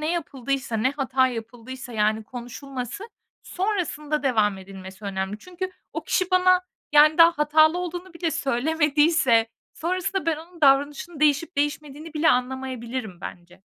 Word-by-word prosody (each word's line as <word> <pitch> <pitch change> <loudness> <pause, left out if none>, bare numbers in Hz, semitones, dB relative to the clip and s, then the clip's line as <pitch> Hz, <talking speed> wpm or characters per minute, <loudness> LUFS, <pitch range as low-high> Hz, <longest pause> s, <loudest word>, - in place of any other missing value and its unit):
ne 305 +1 -1
yapıldıysa, 275 -6 -3
ne 240 +5 +2
hata 265 -2 +1
yapıldıysa, 245 +2 -8
yani, 215 0 +1
konuşulması, 250 - -7 0.4
sonrasında 330 -7 -2
devam 215 -7 +2
edilmesi 190 +1 -11
önemli. 195 +1 -3
Çünkü 365 - -6 0.2
o - - -5
kişi 365 0 0
bana, 365 0 +5 0.3
yani, 300 +2 +6
daha 335 0 +8
hatalı 310 +3 +4
olduğunu 360 0 -6
bile 335 -1 -1
söylemediyse 295 -3 +2 0.3
sonrasında 365 +1 -2
ben 325 - +2
onun 335 +2 -13
davranışını 290 +3 +2
değişip 305 +2 +2
değişmediğini 295 +2 -3
bile 310 +1 +3
anlamayabilirim 250 -5 -3
bence. 180 +1 -10
285 Hz, 130 wpm, -24 LUFS, 240-325 Hz, 0.4 s, daha